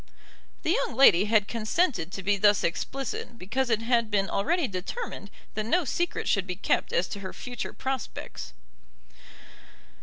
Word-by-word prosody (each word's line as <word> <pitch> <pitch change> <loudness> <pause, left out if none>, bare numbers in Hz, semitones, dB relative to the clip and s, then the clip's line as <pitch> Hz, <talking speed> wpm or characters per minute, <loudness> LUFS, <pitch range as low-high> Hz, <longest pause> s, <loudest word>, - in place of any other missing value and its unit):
The 320 - +2
young 355 - 0
lady 205 -8 +7
had 215 -2 +3
consented 230 - 0
to 195 - -5
be 205 +2 +3
thus 205 +1 +4
explicit 240 +5 -3
because 240 +8 -1
it 225 -1 +1
had 235 -2 +2
been 200 -2 +1
already 320 - +1
determined 200 - -5 0.2
that 215 - -2
no 350 +7 +2
secret 345 +7 -1
should 200 -2 +1
be 180 - -3
kept - - 0
as 170 0 +1
to 200 - -5
her 190 -1 -6
future 245 -1 -5
prospects. 265 - -5
220 Hz, 155 wpm, -27 LUFS, 200-265 Hz, 0.2 s, lady